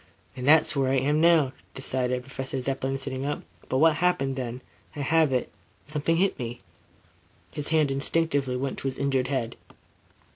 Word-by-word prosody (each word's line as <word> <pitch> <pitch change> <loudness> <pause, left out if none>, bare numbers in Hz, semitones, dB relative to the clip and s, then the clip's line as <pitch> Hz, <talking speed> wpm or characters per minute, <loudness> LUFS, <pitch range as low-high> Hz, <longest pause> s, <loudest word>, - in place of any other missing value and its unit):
"And 125 0 -4
that's 155 +1 +5
where 135 -2 +2
I - - +3
am 145 +4 +2
now," 160 -5 +5 0.2
decided 125 -1 -1
Professor 135 0 -5
Zepplin, 135 +1 -2
sitting 130 -1 -4
up. 145 +1 -3 0.3
"But, 130 - +1
what 155 +1 +5
happened 140 -6 +1
then? 125 -1 -4 0.3
I 145 - -4
have 160 +1 +3
it. 125 -1 0 0.3
Something 150 +3 0
hit 195 +2 +1
me." 120 -1 -5 0.9
His 145 - -5
hand 155 -3 +2
instinctively 140 -2 0
went 135 +1 -3
to - - -3
his 130 - -3
injured 135 -2 +1
head. 125 -4 -2
135 Hz, 170 wpm, -26 LUFS, 130-150 Hz, 0.9 s, that's